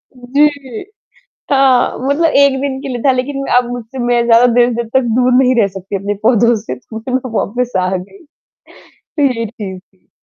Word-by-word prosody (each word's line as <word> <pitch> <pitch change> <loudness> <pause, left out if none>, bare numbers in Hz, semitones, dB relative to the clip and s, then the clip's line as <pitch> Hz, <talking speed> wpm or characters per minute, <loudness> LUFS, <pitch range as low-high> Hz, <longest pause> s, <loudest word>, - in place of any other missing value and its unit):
जी। 270 0 -1 0.7
हाँ, 270 -3 +3
मतलब 315 +3 +2
1 280 -1 +4
दिन 270 -1 -3
के 280 - -6
लिए 245 -2 -4
था 275 - +4
लेकिन 275 +2 -3
अब 250 - +4
मुझसे 245 +1 -7
मैं 240 -1 +1
ज़्यादा 235 +1 +5
देर-देर 240 -1 +2
तक 265 - +5 0.2
दूर 250 0 +3
नहीं 255 0 +2
रह 200 - +3
सकती 195 +1 -6
अपने 200 +2 -3
पौधों 235 +1 +3
से 215 - -6
तो 175 - -13
मतलब 255 +1 -4
वापस 245 +4 -2
आ 185 - 0
गई। 325 - -11 1.0
जी, 250 -5 +1
जी, 205 -4 -7
जी। 190 0 -27
245 Hz, 175 wpm, -15 LUFS, 225-265 Hz, 1.0 s, ज़्यादा